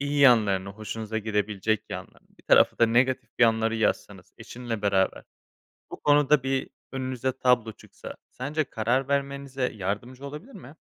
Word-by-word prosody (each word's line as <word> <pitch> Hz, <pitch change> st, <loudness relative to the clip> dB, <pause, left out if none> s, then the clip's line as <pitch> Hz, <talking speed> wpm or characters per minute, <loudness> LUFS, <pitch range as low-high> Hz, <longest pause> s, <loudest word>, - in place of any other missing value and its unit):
iyi 145 Hz, +1 st, -1 dB
yanlarını, 105 Hz, -7 st, +4 dB
hoşunuza 110 Hz, +2 st, -5 dB
gidebilecek 105 Hz, 0 st, -1 dB
yanlarını, 95 Hz, -3 st, -9 dB
bir -, -, -20 dB
tarafa -, -, +4 dB
da 115 Hz, -, +5 dB
negatif 125 Hz, +1 st, +1 dB
yanları 115 Hz, -1 st, +3 dB
yazsanız 110 Hz, -, -2 dB
eşinle 120 Hz, -3 st, -6 dB
beraber, 95 Hz, -2 st, +1 dB, 0.7 s
bu -, -, -9 dB
konuda 145 Hz, -1 st, +4 dB
bir 135 Hz, 0 st, -1 dB, 0.2 s
önünüze 130 Hz, -1 st, -2 dB
tablo 120 Hz, -4 st, +2 dB
çıksa -, -, -11 dB, 0.2 s
sence 150 Hz, +5 st, -2 dB
karar 125 Hz, +2 st, -1 dB
vermenize 140 Hz, -2 st, -2 dB
yardımcı 110 Hz, +7 st, -4 dB
olabilir 150 Hz, -, -9 dB
mi? 140 Hz, -, -12 dB
120 Hz, 140 wpm, -26 LUFS, 110-135 Hz, 0.7 s, da